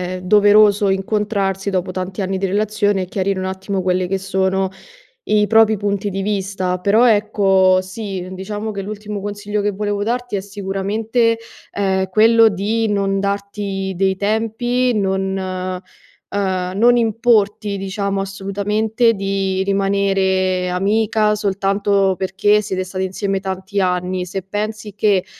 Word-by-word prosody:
è 185 - -7
doveroso 205 +1 +5
incontrarsi 195 0 -1
dopo 185 -1 -1
tanti 185 +1 -4
anni 190 0 -1
di 195 - -1
relazione 205 0 0
e - - -4
chiarire 190 +1 -2
un 185 - -3
attimo 190 +1 -3
quelli 185 0 0
che 195 +1 -1
sono 190 0 0 0.6
i 210 -1 +3
propri 220 -1 +4
punti 200 0 -1
di 195 0 -3
vista. 190 -2 -2
Però 210 +6 +4
ecco 195 -3 +3
sì 190 -1 -6
diciamo 210 +3 -5
che 200 -1 -4
l'ultimo 210 0 -6
consiglio 205 0 -3
che 205 0 0
volevo 205 0 -2
darti 245 -1 -2
è - - -1
sicuramente, 205 +4 -1 0.3
ehm, 190 -1 0
quello 225 +3 +5
di 215 +3 -1
non 195 -1 0
darti 200 -1 -3
dei 190 0 +2
tempi, 225 +5 0
non, 190 -1 -1
ehm, 185 0 -4 0.9
non 240 +3 +5
importi 215 -3 +1
diciamo 195 0 -2
assolutamente 210 +4 0
di 195 -1 -1
rimanere 195 -2 +1
amica 210 +3 +1
soltanto 200 -1 +1
perché 195 +2 +2
siete 190 -2 -3
stati 185 0 -4
insieme 195 +1 -2
tanti 190 +1 -4
anni. 180 0 -1
Se 190 +2 -4
pensi 210 +1 -4
che 200 -3 +2
200 Hz, 135 wpm, -19 LUFS, 190-210 Hz, 0.9 s, doveroso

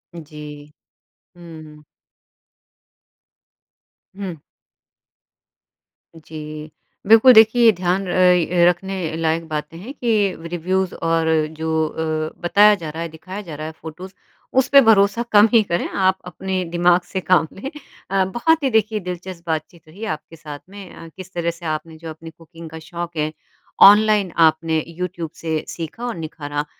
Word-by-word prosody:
जी। 150 -2 -11 0.7
हुँ। 155 -3 -13 2.3
हुँ। 185 -5 -6 1.8
जी। 155 -1 -9 0.4
बिल्कुल, 225 +4 +8
देखिए 225 +1 +6
ध्यान 185 +2 0
र - - -3 0.6
अ, - - +7
रखने 190 +2 -3 0.3
लायक 165 +1 0
बातें 155 +1 -5
हैं 220 +11 -9
कि 215 -8 0 0.2
रिव्यूज़ 185 +2 -1 0.2
और 165 -1 +1 0.3
जो 160 0 -3 0.2
अ, 155 0 -4
बताया 205 +4 +5
जा 155 - -4
रहा 160 +2 -6
है, 170 - -5
दिखाया 190 +5 -8
जा 155 - -6
रहा 155 +1 -6
है, - - -6
फ़ोटोज़ 180 +4 -9 0.5
उस 265 - +1
पे 280 - +9
भरोसा 220 -1 +3
कम 210 +1 +7
ही 230 - +7
करें, 170 -4 -2
आप 190 -1 +1
अपने 185 +1 -4
दिमाग 175 +1 +3
से 190 - -2
काम 175 -3 +2
लें। 240 +8 -7 0.4
अ, 190 0 +1
बहुत 320 +5 +2
ही 270 - +2
देखिए 215 0 +2
दिलचस्प 180 -1 -7
बातचीत 160 +1 -5
रही 195 +8 -9
आपके 155 +2 -16
साथ 150 -2 -9
में। 200 -2 -11
अ, 165 - -11
किस 185 0 -11
तरह 170 -1 -1
से 175 - -11
आपने 160 +1 -7
जो 165 +1 -9
अपनी 160 +1 -10
कुकिंग 165 0 -13
का 160 +1 -9
शौक 175 -1 -6
है, 155 0 -1 0.6
ऑनलाइन 210 -2 +3
आपने 160 0 +1
यूट्यूब 170 0 -5
से 160 -1 -3
सीखा 170 +9 -7
और 240 - -3
निखारा। 150 -3 -5
170 Hz, 150 wpm, -20 LUFS, 160-195 Hz, 2.3 s, पे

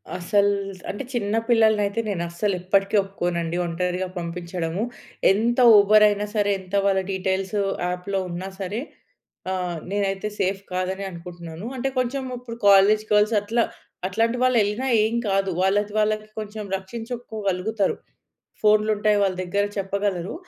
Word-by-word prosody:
అసల్ 200 +3 +2 0.4
అంటే 205 - -4
చిన్న 215 -2 -1
పిల్లలని 220 -2 +4
అయితే, 200 +3 -2
నేను 185 -4 -2
అస్సలు 190 +3 -1
ఎప్పటికీ 195 +3 +1
ఒప్పుకోనండి 175 -3 -2
ఒంటరిగా 180 +2 -2
పంపిచ్చడము. 170 +1 -4 0.5
ఎంత 235 +5 +1 0.2
ఉబర్ 210 +1 +6
అయినా 205 0 0
సరే 205 -1 +2
ఎంత 185 +1 -6
వాళ్ళ 195 -1 +3
డీటెయిల్సొ 190 +2 -1 0.3
యాప్‌లో 180 +2 -2
ఉన్న 175 +1 -5 0.2
సరే, 195 +4 -3 0.7
ఆహ్, 180 -2 -2
నేనైతే 200 0 -1
సేఫ్ 195 0 0
కాదని 185 +2 -2
అనుకుంటున్నాను. 170 +2 -8
అంటే, 270 +2 -1
కొంచెం 260 +2 -1
ఇప్పుడు 235 -1 -8
కాలేజ్ 200 +2 +6
గర్ల్స్ 210 +2 +4
అట్లా, 230 +3 +1 0.4
అట్లాంటి 230 +5 0
వాళ్ళు 255 -1 +3
యెళ్ళిన 210 +5 -1 0.2
ఏం 220 +2 0 0.2
కాదు. 195 0 +1
వాళ్ళది, 205 +2 +1
వాళ్ళకి 215 0 0
కొంచెం 215 0 -6
రక్షించుకోగలుగుతరు. 215 -2 -3 0.7
ఫోన్‌లుంటాయి 215 0 +3
వాళ్ళ 190 -1 +1
దగ్గర 200 +3 0
చెప్పగలరు. 195 -2 -2
200 Hz, 130 wpm, -24 LUFS, 185-215 Hz, 0.7 s, ఉబర్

